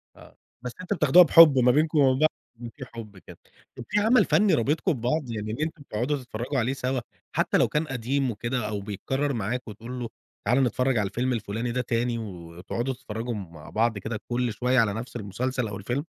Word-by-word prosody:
آه. - - -17 0.2
بس 125 0 -5
أنتم 185 - -2
بتاخدوها 155 +5 +7
بحُب 160 -4 +8
ما 125 0 +5
بينكم 155 +4 +2
وما 135 -2 +5
بين 130 - -2
بع 155 - +5 0.4
إن - - -5
في 135 - -8
حُب 110 -5 -10
كده. 90 - -14 0.4
طب - - -7
في 210 - +2
عمل 230 +4 +4
فني 205 -2 +3
رابطكم 150 - +1
ببعض، 130 +1 -2
يعني 110 -1 -4
إن 110 - -4
أنتم 155 0 -3
بتقعدوا 130 +4 -2
تتفرّجوا 125 +1 -3
عليه 120 +3 0
سوى؟ 130 -1 -2 0.3
حتى - - +2
لو - - +4
كان 150 +1 -1
قديم 135 +1 -1
وكده، 120 +1 -3
أو 105 -1 -3
بيتكرر 135 +8 -2
معاك 120 +3 -3
وتقول 115 +4 -7
له: 120 -2 -4 0.4
"تعالَ 125 +6 +3
نتفرّج 125 +1 +1
على 105 -2 +1
الفيلم 125 +5 -1
الفُلاني 115 +1 -3
ده 125 +1 0
تاني، 120 0 -1
و 85 -7 -8
وتقعدوا 120 +8 -3
تتفرّجوا 120 -1 -5
مع 85 -7 -9
بعض 115 0 +1
كده 110 +2 -4
كل 120 -1 -1
شوية 125 +3 +2
على 110 -3 +2
نفس 115 +4 -7
المسلسل، 120 +4 -2
أو 100 -1 -6
الفيلم؟ 120 +9 -3
120 Hz, 210 wpm, -26 LUFS, 110-135 Hz, 0.4 s, بحُب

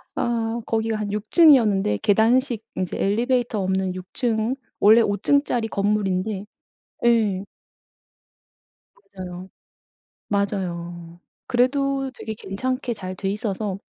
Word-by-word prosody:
아 235 0 -1
거기가 225 -1 0
한 205 -1 -3
6 210 +1 -4
층이었는데 220 - +5
계단식 225 +2 +2
인제 185 -1 -2
엘리베이터 235 +1 +1
없는 190 0 -1
6 185 0 -7
층. 230 0 0 0.3
원래 210 -1 +5
층짜리 245 -1 +1
건물인데 200 -1 -1 0.6
예. 210 -5 +2 1.6
맞아요. 185 -1 -9 0.8
맞아요. 175 -4 -3 0.3
그래도 270 +2 +1
되게 220 - -5
괜찮게 255 +5 -3
잘 185 -2 -6
돼 195 0 -2
있어서 205 -2 -3
210 Hz, 225 characters per minute, -23 LUFS, 190-235 Hz, 1.6 s, 층이었는데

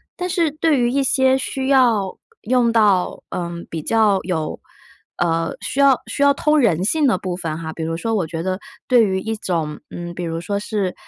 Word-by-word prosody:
但 360 0 -3
是 335 -4 +1
对 310 -1 +1
于 240 0 +2
一 275 +1 +1
些 265 0 +3
需 265 0 -3
要 235 -8 +3 0.2
用 240 0 +2
到， 205 -5 +2
嗯， 170 -1 -5
比 160 -2 -4
较 215 0 +2
有 165 -3 -3 0.6
呃， 165 -1 0
需 275 - -4
要 275 -2 +6
需 - - -4
要 280 0 +6
通 300 +1 +2
人 185 - +2
性 295 +7 +2
的 225 - +2
部 180 -1 -4
分 165 -4 -4
哈， 160 -1 -5
比 160 - -5
如 165 +1 -2
说 225 +6 -2
我 175 -6 0
觉 165 +1 -4
得 185 +1 -2 0.3
对 245 -3 +5
于 190 -1 0
一 225 +2 -3
种， 160 -6 -3
嗯， 175 0 -7
比 175 - -5
如 165 -1 -3
说 200 +3 -2
是 200 -3 -2
200 Hz, 220 characters per minute, -20 LUFS, 170-260 Hz, 0.6 s, 要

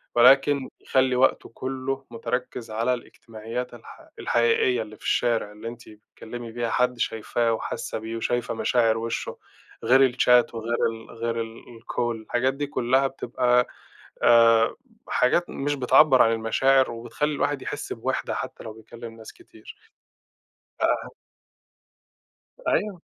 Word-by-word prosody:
ولكن 135 +3 +5
يخلّي 130 -1 +2
وقته 130 +1 +2
كلّه 135 +1 -4
مُتركّز 125 0 -4
على 115 +3 0
الإجتماعيات 120 0 -7
الح 120 - -14
الحقيقية 120 +1 +2
اللي 110 -1 -8
في - - -20
الشارع، 115 -3 0
اللي 105 +2 -9
أنتِ 120 +1 -9
بتكلّمي 115 +2 -10
بيها 120 0 -2
حد 125 +1 +1
شايفاه 115 +1 0
وحاسّة 110 - -4
بيه 110 +1 -5
وشايفة 120 +1 -1
مشاعر 115 -1 +2
وشّه، 115 0 -4 0.5
غير 135 +2 +6
الشات 125 -1 +3
وغير 115 +1 -2
ال 115 0 -11
غير 115 0 -3
ال 115 0 -8 0.2
الcall، 120 0 -2
الحاجات 120 +4 0
دي 145 +1 -3
كلّها 130 0 +1
بتبقى 125 -2 +1 0.6
آآ، 115 -1 +5 0.3
حاجات 170 +8 +2
مش 145 +1 -2
بتعبّر 135 +1 +5
عن 115 - +5
المشاعر 120 +4 +2
وبتخلّي 120 +6 -3
الواحد 145 -1 -1
يحس - - -5
بوِحدة - - -3
حتى - - -6
لو 110 - -7
بيكلّم 115 +1 -11
ناس 110 - -11
كتير، 350 - -15 1.0
ده - - +3
أهم - - -1 1.6
أيوه. 205 -4 0
120 Hz, 135 wpm, -25 LUFS, 115-130 Hz, 1.6 s, غير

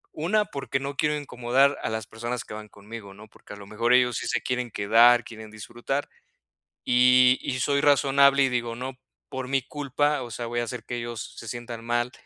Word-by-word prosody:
Una, 205 +7 +1
porque 140 -5 -4
no 140 +1 -5
quiero 150 0 +1
incomodar 135 0 +1
a - - -1
las 110 0 -4
personas 120 +1 -5
que - - -10
van 110 0 -9
conmigo, 105 0 -11
¿no?, 105 +2 -14
porque, - - -14
a - - -10
lo 100 -1 -12
mejor, 115 +4 +1
ellos 125 -1 +3
sí - - -4
se - - -1
quieren 125 -1 -2
quedar, 115 +5 +5
quieren 110 -1 -10
disfrutar, 120 +6 -5 0.8
y 125 +1 +5
y 130 - -3
soy 140 +2 +1
razonable, 140 -1 +4
y - - +3
digo: 120 -2 -2
"No 130 +2 -6 0.3
por 130 -1 -5
mi 135 0 +1
culpa, 145 +1 -1
o 120 - -8
sea, 120 +2 -5
voy 120 +1 -2
a - - -1
hacer 120 -1 -7
que 120 - -5
ellos 120 -1 -6
se 115 - -9
sientan 120 -1 -7
mal 120 +1 -1
120 Hz, 210 wpm, -25 LUFS, 115-135 Hz, 0.8 s, quedar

